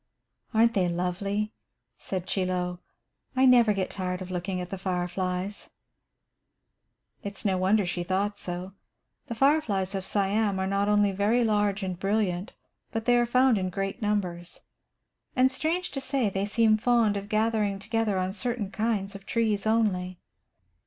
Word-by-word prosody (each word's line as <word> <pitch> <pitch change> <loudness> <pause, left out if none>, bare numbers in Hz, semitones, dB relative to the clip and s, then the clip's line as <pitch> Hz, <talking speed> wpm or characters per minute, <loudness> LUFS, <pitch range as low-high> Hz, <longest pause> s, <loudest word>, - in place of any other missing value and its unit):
"Aren't 230 0 +4
they 185 -3 +2
lovely?" 195 +5 -2 0.4
said 185 -2 -5
Chie 190 0 0
Lo. 180 -1 -2 0.6
"I 260 +1 +4
never 240 -4 +6
get 195 -2 -1
tired 180 -2 -3
of 185 -1 -7
looking 180 +1 -3
at 180 0 -6
the 195 - -4
fireflies." 185 +1 -3 1.5
It 200 -1 -6
is - - -6
no 195 -2 +2
wonder 195 +2 +3
she 175 0 -2
thought 195 +3 -1
so. 180 +2 -5 0.5
The 235 - -4
fireflies 225 -8 +2
of 195 -1 -2
Siam 200 +1 +1
are 190 - -1
not 200 +1 0
only 205 -1 +3
very 210 +5 +2
large 205 -2 +1
and 185 -2 -4
brilliant, 195 0 -1 0.4
but 225 0 -3
they 245 - +4
are 240 0 +3
found 250 -2 +4
in 185 -1 -1
great 195 +5 -4
numbers. 180 -5 -2 0.7
And, 260 0 +4
strange 335 +6 -1
to 275 - -3
say, 265 -5 0
they 195 +1 -1
seem 215 0 +3
fond 230 -2 +2
of 200 0 -5
gathering 215 -2 +1
together 220 0 -1
on 185 0 -1
certain 225 -2 -2
kinds 210 -3 -1
of 195 0 -11
trees 215 -3 0
only. 185 -5 +1
200 Hz, 160 wpm, -27 LUFS, 185-225 Hz, 1.5 s, never